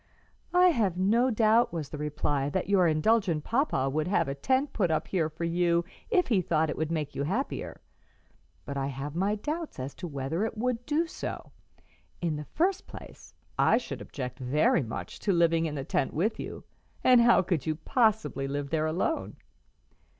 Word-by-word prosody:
"I 360 0 +7
have 210 - +1
no 225 +7 +3
doubt," 225 0 +3
was 160 -4 -4
the 150 - -7
reply, 145 -2 -1
"that 185 +5 -2
your 195 -3 +4
indulgent 165 0 +2
papa 235 - +1
would 155 +4 -1
have 190 -4 +1
a 135 - -2
tent 260 - 0
put 185 -6 +1
up 160 - 0
here 165 -5 0
for 160 +2 -7
you 170 0 +1 0.2
if 370 - +2
he 205 -6 +3
thought 160 -2 +1
it - - -4
would 160 0 -2
make 150 -3 -2
you - - -3
happier, 195 - -3 0.9
but 140 - -5
I 135 0 -1
have 140 +2 -5
my 195 +4 +1
doubts 310 +9 -4
as 130 +1 -5
to 180 - -3
whether 145 +5 -2
it 225 0 -3
would 245 +1 -2
do 310 +3 +1
so. 330 - -6 0.7
In 165 -3 -1
the 150 0 -6
first 375 - 0
place, - - -12 0.2
I - - +5
should - - -5
object 125 -3 -6
very 145 +6 +2
much 115 -4 -6
to 205 - 0
living 165 -2 +3
in 150 - -5
the 135 -2 -4
tent 135 - -1
with 210 +8 0
you, - - -6 0.4
and 250 -2 +7
how 235 -5 +5
could 170 -6 -1
you 155 - +1
possibly 220 - +1
live 140 0 -4
there 155 -1 +1
alone?" 180 - -1
170 Hz, 190 wpm, -28 LUFS, 150-225 Hz, 0.9 s, I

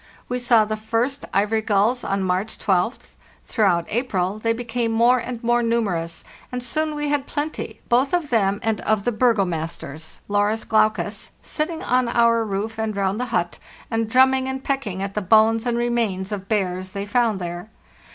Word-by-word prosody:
We 250 0 -2
saw 240 -3 +4
the 215 0 -3
first 230 +6 -1
ivory 210 +3 +1
gulls 215 +4 +1
on 195 0 -1
March 185 +4 -1
12th; 190 +5 -1 0.3
throughout 185 -7 +1
April 205 -4 -1
they 230 +1 +1
became 230 0 -2
more 235 +3 +4
and 240 0 -6
more 240 +1 +3
numerous, 195 -9 -1 0.3
and 250 -1 -3
soon 310 +5 -1
we 295 0 -2
had 285 -1 0
plenty, 300 +2 -4
both 255 +3 +3
of 345 -6 0
them 200 -3 +2
and 225 -2 0
of 215 -2 0
the 245 - +2
burgomasters 170 - -1
(Larus 205 +2 +1
glaucus), 215 0 +1
sitting 320 +1 -3
on 250 0 +2
our 235 -1 +3
roof 215 +2 -3
and 220 -1 -2
round 195 +2 0
the 250 - -1
hut, - - -2 0.3
and 225 -1 0
drumming 260 +2 +4
and 265 0 -4
pecking 215 -9 -2
at 200 0 -4
the 210 - -1
bones 220 +4 +4
and 235 -1 +1
remains 230 -5 -1
of 195 -2 -5
bears 185 -3 -1
they 200 0 -3
found 230 -1 +1
there. 175 +3 -6
225 Hz, 175 wpm, -22 LUFS, 200-245 Hz, 0.3 s, saw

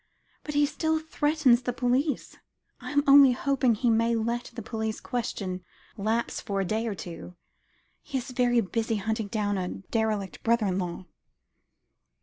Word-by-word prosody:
But 300 - -5
he 290 0 +5
still 315 +2 0
threatens 295 -5 +2
the 245 0 -2
police. 255 +4 0 0.4
I - - -7
am 290 -1 +2
only 275 -2 +8
hoping 260 -2 +1
he 235 +2 +2
may 230 +1 +2
let 235 +2 -1
the 230 - -6
police 220 -1 -3
question 195 -6 -4 0.3
lapse 220 +2 -1
for 200 -3 -2
a 195 - 0
day 220 +4 -1
or 210 - -2
two; 175 0 -8 0.7
he 275 - -4
is 255 0 -5
very 245 -1 +3
busy 225 +2 -1
hunting 220 +1 -2
down 205 -2 -1
a 180 - -2
derelict 210 0 -2
brother 230 -1 +2
in 190 -1 0
law." 180 0 -4
230 Hz, 160 wpm, -27 LUFS, 210-255 Hz, 0.7 s, only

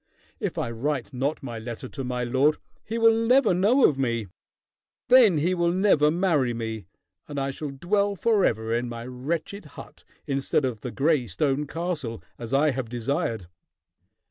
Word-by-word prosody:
If - - -3
I 115 - -2
write 135 +3 -3
not 140 +4 -2
my 120 -4 -5
letter 120 +3 -7
to 135 +1 -6
my 125 -1 -2
lord, 135 +5 +2 0.3
he 225 - -4
will 225 0 +5
never 230 0 +3
know 210 +9 +4
of 140 -3 -2
me. 115 -6 -1 0.8
Then 240 -9 +7
he 170 +5 +1
will 170 -1 +1
never 180 -5 +3
marry 155 -8 +1
me, 110 -4 -5 0.4
and 145 -1 -4
I 135 0 -1
shall 150 +2 -5
dwell 200 +8 0
forever 140 - +1
in 120 +1 -1
my 115 0 -7
wretched 155 +10 -4
hut - - -12 0.2
instead 135 +1 0
of 120 -5 -3
the 125 - -4
gray 140 -1 +1
stone 135 +9 -1
castle, 155 -9 -4 0.2
as 115 -1 -7
I 145 +2 +3
have 130 -3 -4
desired." 120 - -2
140 Hz, 170 wpm, -25 LUFS, 120-175 Hz, 0.8 s, Then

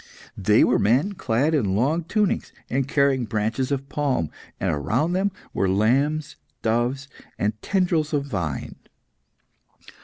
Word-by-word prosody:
They - - +4
were - - +3
men 130 - +2
clad 135 - 0
in 105 -11 +1
long 150 +10 +1
tunics 210 +1 0 0.2
and 135 +1 0
carrying 140 -3 +2
branches 110 +4 -1
of 135 -1 -2
palm, 135 - -1 0.3
and - - 0
around 115 - 0
them 195 +2 +1 0.2
were 95 - +1
lambs, 135 +10 +1 0.3
doves, 120 +5 0 0.3
and 105 +1 -1
tendrils 175 -6 +1
of 145 -2 0
vine. 90 - -4
135 Hz, 130 wpm, -24 LUFS, 110-150 Hz, 0.3 s, They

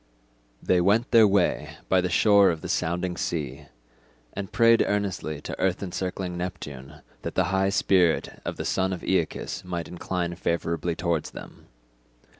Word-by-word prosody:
They 90 -1 +3
went 105 +6 +2
their 115 -3 +7
way 100 -2 +1
by 95 -1 +3
the 90 - -1
shore 100 +2 +5
of 80 -2 -2
the - - -6
sounding 90 +2 -1
sea, 75 -4 -4 0.7
and 95 -1 -5
prayed 115 0 +5
earnestly 95 -7 -2
to - - -7
earth 95 +1 0
encircling 90 0 -4
Neptune 75 -5 -7 0.2
that - - -5
the 95 - +3
high 95 0 +2
spirit 95 -4 +2
of - - -4
the - - -4
son 95 0 0
of 90 - -7
Aeacus - - -1
might 85 -2 -4
incline 90 0 -3
favourably 85 -1 -2
towards 85 -3 -1
them. - - -12
90 Hz, 155 wpm, -26 LUFS, 85-95 Hz, 0.7 s, their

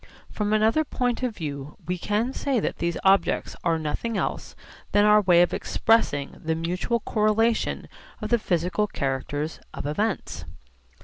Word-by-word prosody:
From 210 -1 -2
another 220 +8 +3
point 250 -4 -1
of 250 -4 -2
view 145 -3 -6
we 180 - -1
can 215 +8 0
say 270 -3 0
that - - -3
these 170 0 -1
objects 190 -2 +2
are 165 -2 +2
nothing 160 +9 -2
else - - -3 0.4
than 205 0 +5
our 210 0 +6
way 175 -3 +5
of 175 - -1
expressing 205 -11 +1
the 160 0 0
mutual 180 +8 -1
correlation 220 +2 +1 0.3
of - - -5
the 240 - +4
physical 180 +2 0
characters 145 0 -3 0.2
of - - -5
events. 155 - -2
200 Hz, 150 wpm, -25 LUFS, 160-225 Hz, 0.4 s, our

